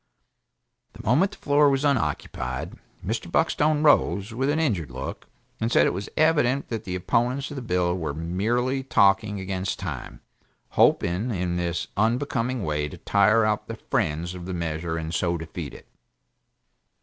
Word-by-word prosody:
The - - -11
moment 160 - +3
the - - -12
floor 145 0 +4
was 135 +1 +1
unoccupied, 75 - -1 0.3
Mr. - - -3
Buckstone 150 0 +2
rose, 100 - +3
with 135 +4 0
an 150 - +1
injured 110 - 0
look, 65 0 -6 0.3
and 115 +1 -1
said - - +5
it - - +1
was 95 +3 -5
evident 145 -4 +2
that 115 -2 -4
the 90 - -3
opponents 125 +9 0
of - - -6
the 135 - -4
bill 90 -5 0
were 80 -5 -3
merely 115 - 0
talking 105 -4 +3
against 95 0 -3
time, 80 -9 -6 0.5
hoping 90 +8 +2
in 90 -5 -1
this 85 -1 -1
unbecoming 120 +2 0
way 75 -1 -1
to - - -10
tire 105 +2 +3
out 105 0 0
the - - -5
friends 80 +4 -1
of 90 -1 -8
the 95 - -3
measure 80 0 -3
and 80 0 -4
so 85 0 0
defeat 80 -1 -6
it. - - -13
100 Hz, 160 wpm, -25 LUFS, 85-125 Hz, 0.5 s, said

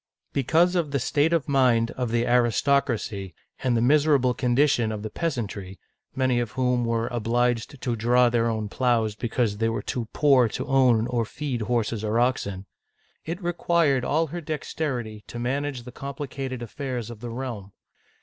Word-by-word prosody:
Because 160 +7 +3
of 170 -4 +1
the 140 - 0
state 145 +5 +1
of 165 -4 +1
mind 125 -5 +3
of 125 -2 -3
the 120 +1 +1
aristocracy, 120 - +1 0.3
and 125 -2 +1
the 115 - +2
miserable 140 -2 +4
condition 125 -2 +2
of 105 -1 -5
the 110 - -5
peasantry, 105 - -4 0.2
— - - -45
many 130 -2 +2
of 120 -3 -3
whom 125 -2 +1
were 115 0 0
obliged 120 +2 0
to 120 -2 -1
draw 120 +2 +4
their 115 -1 +1
own 110 -2 -2
plows 115 -1 +1
because 110 -1 -1
they 115 0 +2
were 115 - -3
too 120 -3 -3
poor 135 -5 +4
to - - -4
own 130 -5 +3
or 120 -1 0
feed 130 +1 -4
horses 115 -1 -1
or 110 +2 +1
oxen, 100 -6 0 0.3
— - - -41
it 175 +4 -5
required 170 -6 +2
all 160 +5 +1
her 170 +3 -6
dexterity 130 -8 -4
to 120 - -8
manage 135 +1 -2
the 125 - -9
complicated 135 -2 -5
affairs 125 -2 -5
of 115 - -10
the 120 +1 -6
realm. 115 -5 -6
125 Hz, 175 wpm, -25 LUFS, 115-140 Hz, 0.3 s, miserable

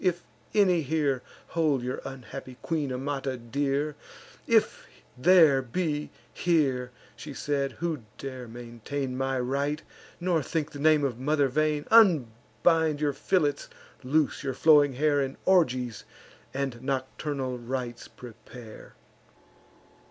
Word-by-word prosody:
if 175 -2 +1 0.3
any 185 -5 +4
here 145 -3 0 0.3
Hold 150 -6 +1
your 125 +1 -3
unhappy 135 -1 -8
queen, 155 -5 -1
Amata, 135 0 -3
dear; 140 +5 -1 0.5
If - - +2 0.3
there 155 -1 +6
be 150 +3 -2 0.2
here," 135 -8 +1 0.3
she 145 -2 -9
said, 140 -1 -1
"who 165 -5 -3 0.2
dare 130 -2 -7
maintain 120 +3 -5
My 135 0 -1
right, 140 +4 -1 0.4
nor 175 -2 +1
think 155 +1 -2
the 145 - -9
name 155 0 +4
of 125 -4 -1
mother 145 +1 +2
vain; 150 +2 0
Unbind 160 - +3
your 145 -1 +1
fillets, 150 -2 0 0.3
loose 145 +3 +1
your 135 -3 -3
flowing 145 -2 +5
hair, 145 +2 +2
And 135 0 -3
orgies 130 - +2 0.5
and 135 -3 -3
nocturnal 130 -1 -3
rites 120 -1 -5
prepare." 120 -1 -12
140 Hz, 120 wpm, -27 LUFS, 130-155 Hz, 0.5 s, there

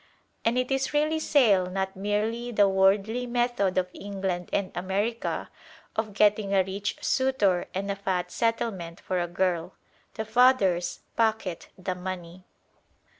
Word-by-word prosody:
And 230 +2 +2
it 255 +1 0
is 270 +2 0
really 305 +2 +2
sale, 215 -12 +4
not 190 +1 -3
merely 215 +5 -1
the 205 -3 +4
worldly 195 +5 +2
method 240 -6 0
of 180 0 +1
England 190 -3 -4
and 195 -2 -1
America 200 +6 -2 0.4
of 220 -2 -2
getting 205 -1 +3
a 190 - +5
rich 195 +2 -3
suitor 240 -9 +2
and 200 +1 -1
a - - -2
fat 185 -3 -2
settlement 210 -7 -1
for 185 -1 -2
a 175 - -1
girl. 175 -1 -1 0.4
The 220 - -3
fathers 220 -8 +3
pocket 220 -6 0
the 185 0 -3
money. 180 -1 -7
200 Hz, 140 wpm, -27 LUFS, 185-230 Hz, 0.4 s, a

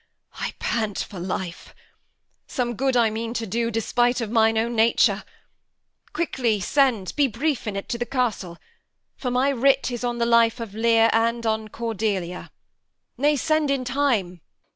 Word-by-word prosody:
Edm. - - -3
I - - -8
pant 215 -4 -2
for 190 - -5
life. 180 -1 -5 0.7
Some 245 -2 -2
good 265 +2 +1
I 230 -2 +3
mean 230 +2 -4
to 230 - -2
do, 230 +3 -1
Despite 240 +2 +1
of 225 -3 -4
mine 225 -1 +3
own 235 +2 0
nature. 225 +1 +3 0.9
Quickly 245 -10 0
send 230 -2 +1
(Be 290 -2 +3
brief 265 +1 -2
in't) 200 -1 -4
to 235 - -3
the 240 - -1
castle; 225 -9 -2 0.6
for 255 - -4
my 250 +3 +2
writ 270 0 +2
Is 240 0 -5
on 240 -1 -1
the 235 - +1
life 235 0 +3
of 225 -4 -6
Lear 225 0 +3
and 230 +1 +1
on 220 -1 0
Cordelia. 210 -6 -3 0.7
Nay, 290 +4 +2
send 310 +1 +1
in 275 -2 0
time. 240 - 0
230 Hz, 165 wpm, -24 LUFS, 220-250 Hz, 0.9 s, I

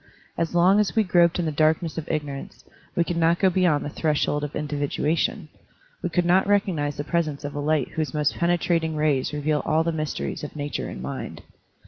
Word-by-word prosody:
As 170 +1 -2
long 185 +4 +5
as 210 +1 0
we 220 - +4
groped 170 -3 +3
in 175 - -1
the 155 - 0
darkness 155 +2 +1
of 165 - -5
ignor 145 -3 -2
ance, - - -13 0.3
we 170 - +3
could 170 0 -3
not 165 +1 +3
go 190 0 +3
beyond 175 -5 +2
the - - -3
threshold 150 -1 0
of 150 - -5
individuation; 150 +2 -1 0.5
we 180 - -2
could 170 +1 +1
not 185 +3 +3
recognize 175 -8 +1
the 145 - -2
pres 170 +1 0
ence 145 -1 -6
of 145 - -5
a 145 - -4
light 150 -2 +1
whose 155 -2 -3
most 150 -1 +1
penetrating 170 -2 +1
rays 150 -4 +1
reveal 150 0 0
all 160 +1 +2
the 170 - 0
mysteries 155 -2 -3
of 150 - -7
nature 145 -1 -3
and 65 - -7
mind. 65 - -6
155 Hz, 210 wpm, -24 LUFS, 150-170 Hz, 0.5 s, long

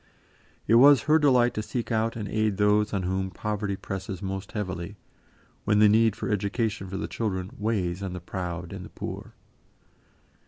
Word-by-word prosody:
It - - +2
was 140 -3 +7
her 155 +1 +4
delight 125 -5 +4
to 110 - -2
seek 115 +3 -4
out 115 0 0
and 105 -3 -4
aid 110 -1 0
those 105 0 +3
on 100 -2 -1
whom 95 +1 -1
poverty 105 +1 -3
presses 95 -1 -6
most 95 0 -5
heavily, 95 -1 -4 0.7
when 105 - +2
the 105 0 +7
need 110 0 +4
for - - -4
education 105 0 -1
for 95 +1 -5
the - - -3
children 95 -4 -3
weighs 100 -4 -1
on 95 -2 -4
the 90 - -5
proud 90 -1 -5
and - - -7
the - - -10
poor. - - -7
105 Hz, 180 wpm, -26 LUFS, 95-110 Hz, 0.7 s, was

